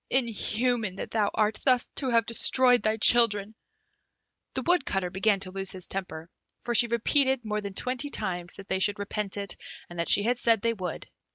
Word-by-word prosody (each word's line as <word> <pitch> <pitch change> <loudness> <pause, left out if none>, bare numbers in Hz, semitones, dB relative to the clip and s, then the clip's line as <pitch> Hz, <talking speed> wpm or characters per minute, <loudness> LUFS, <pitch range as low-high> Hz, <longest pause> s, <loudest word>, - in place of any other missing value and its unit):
Inhuman 235 -3 0
that - - -7
thou 210 -3 +1
art, 215 0 0
thus 255 -2 +2
to 265 - 0
have 230 -2 +2
destroyed 245 +2 +4
thy 215 0 0
children!" 215 -2 +4 1.0
The - - -2
Woodcutter 230 - 0
began 200 +2 +1
to 185 - -2
lose 195 0 -5
his 185 -1 -5
temper, 170 -4 -6 0.4
for 240 - -2
she 235 +1 +6
repeated 260 +2 +1
more 210 0 -3
than 200 -2 -8
twenty 255 +5 -2
times 180 -8 -4
that 195 - -11
they 190 - -1
should 205 +1 0
repent 205 0 -4
it, 200 -3 -1 0.4
and 175 - -9
that 170 - -1
she 205 - +5
had 245 +2 0
said 230 -3 +2
they 230 0 +1
would. 185 -6 -6
215 Hz, 190 wpm, -26 LUFS, 195-240 Hz, 1.0 s, she